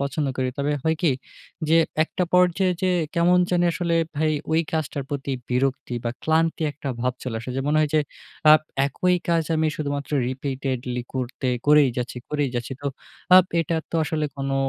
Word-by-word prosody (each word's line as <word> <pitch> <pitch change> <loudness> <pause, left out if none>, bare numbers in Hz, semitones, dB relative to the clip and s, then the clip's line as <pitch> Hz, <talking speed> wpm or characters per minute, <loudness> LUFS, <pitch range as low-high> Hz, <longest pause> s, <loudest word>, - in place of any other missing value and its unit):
পছন্দ 140 +1 -1
করি। 130 -1 0
তবে 145 +1 0
হয় 160 0 +1
কি 160 - +4 0.6
যে 165 - +5 0.3
একটা 180 - -2
পর্যায়ে 180 +1 +4
যেয়ে 185 -1 +2 0.2
কেমন 175 +1 +4
জানি 175 -1 +2
আসলে 170 +1 -1 0.2
ভাই 155 +1 +2 0.2
ঐ - - 0 0.2
কাজটার 150 -3 -2
প্রতি 140 -1 -3 0.2
বিরক্তি 125 0 0
বা 120 - 0
ক্লান্তি 160 0 +1
একটা 145 -1 -7
ভাব 125 +1 +1
চলে 120 -3 -3
আসে। 125 - -6
যে - - 0
মনে 155 +1 +2
হয় 150 -1 +1
যে 155 - +5 0.5
আ - - +11 0.3
একই 180 +6 +1
কাজ 165 -1 +3
আমি 160 0 +2
শুধুমাত্র 145 -1 -3 0.2
repeatedly 130 -2 -3
করতে 130 +1 -3 0.2
করেই 150 -2 +6
যাচ্ছি 125 0 -3
করেই 145 -3 0
যাচ্ছি। 120 +2 -4
তো 140 - 0 0.5
আপ 185 - +8 0.2
এটা 165 0 -1
তো 165 - -1
আসলে 155 0 -1
কোনো 135 0 -2
150 Hz, 180 wpm, -24 LUFS, 135-165 Hz, 0.6 s, আ